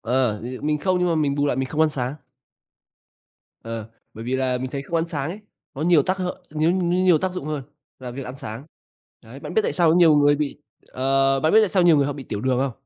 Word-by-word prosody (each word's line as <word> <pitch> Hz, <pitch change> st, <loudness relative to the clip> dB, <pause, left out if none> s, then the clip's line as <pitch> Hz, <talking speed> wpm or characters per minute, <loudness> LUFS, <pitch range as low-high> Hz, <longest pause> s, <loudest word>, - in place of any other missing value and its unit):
ờ, 120 Hz, -3 st, 0 dB
ừ, 125 Hz, +2 st, -7 dB
mình 150 Hz, 0 st, 0 dB
không 185 Hz, +3 st, +1 dB
nhưng 180 Hz, -, +1 dB
mà 170 Hz, -, +1 dB
mình 150 Hz, -3 st, +1 dB
bù 145 Hz, 0 st, 0 dB
lại 135 Hz, -, 0 dB
mình 130 Hz, 0 st, -2 dB
không 155 Hz, +2 st, -2 dB
ăn 160 Hz, -, +4 dB
sáng. 130 Hz, -1 st, -3 dB, 1.5 s
Ờ, 115 Hz, -1 st, -6 dB, 0.3 s
bởi 110 Hz, -, -8 dB
vì 130 Hz, +2 st, -1 dB
là 130 Hz, -1 st, 0 dB
mình 130 Hz, +1 st, -5 dB
thấy 140 Hz, 0 st, -4 dB
không 165 Hz, +4 st, -3 dB
ăn 165 Hz, -, 0 dB
sáng 150 Hz, -2 st, -3 dB
ấy, 205 Hz, -, -8 dB, 0.3 s
có 145 Hz, -, -4 dB
nhiều 165 Hz, -3 st, +4 dB
tác 185 Hz, +6 st, -1 dB
hại 185 Hz, 0 st, -4 dB
nhiêu 155 Hz, +2 st, +1 dB
nhiêu 180 Hz, 0 st, +1 dB
nhiều 180 Hz, -4 st, +5 dB
tác 185 Hz, +2 st, -2 dB
dụng 180 Hz, -5 st, -6 dB
hơn 150 Hz, -2 st, -3 dB, 0.4 s
là 125 Hz, -1 st, -7 dB
việc 135 Hz, +3 st, -6 dB
ăn 125 Hz, -, -7 dB
sáng. 130 Hz, -2 st, -8 dB, 0.6 s
Đấy, -, -, -12 dB
bạn -, -, -7 dB
biết 440 Hz, -, +3 dB
tại -, -, -1 dB
sao 175 Hz, -2 st, +3 dB
có -, -, +4 dB
nhiều 165 Hz, -4 st, +6 dB
người 145 Hz, 0 st, +5 dB
bị, 145 Hz, -1 st, -3 dB, 0.3 s
ờ 135 Hz, +1 st, +2 dB
bạn 155 Hz, +3 st, +2 dB
có -, -, +3 dB
biết -, -, +8 dB
tại 215 Hz, -, +2 dB
sao 185 Hz, -1 st, +2 dB
nhiều 170 Hz, -3 st, +6 dB
người 140 Hz, -1 st, +2 dB
họ 145 Hz, -, -2 dB
bị 140 Hz, -1 st, -8 dB
tiểu 105 Hz, -, -5 dB
đường 130 Hz, +1 st, +1 dB
không? 135 Hz, 0 st, 0 dB
145 Hz, 275 wpm, -23 LUFS, 130-170 Hz, 1.5 s, biết